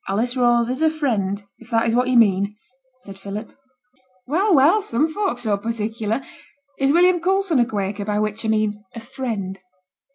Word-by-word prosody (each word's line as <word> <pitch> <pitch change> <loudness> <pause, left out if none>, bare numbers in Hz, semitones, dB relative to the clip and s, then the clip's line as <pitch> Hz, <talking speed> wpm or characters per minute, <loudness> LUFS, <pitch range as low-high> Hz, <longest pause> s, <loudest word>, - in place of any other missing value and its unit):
'Alice 230 +6 -1
Rose 240 -2 +3
is 255 +4 -3
a 320 - +4
Friend, 210 -10 -2
if 235 - -16
that 230 -1 +2
is 230 0 +1
what 250 +1 +2
you 255 -1 +3
mean,' 200 -2 +3 0.5
said 195 -5 -11
Philip. 200 +3 -7 0.7
'Well, 360 +8 +2
well! 315 +10 +5
some 295 - 0
folk's 325 -7 -2
so 215 -3 +1
particular. 225 +2 -3 0.6
Is 275 0 +3
William 350 +2 +4
Coulson 375 -3 +1
a 240 - +3
Quaker, 200 -2 -3
by 210 0 -1
which 215 +1 -2
a 220 - -1
mean 215 -1 0
a - - -5
Friend?' 225 -6 -5
230 Hz, 175 wpm, -21 LUFS, 210-275 Hz, 0.7 s, well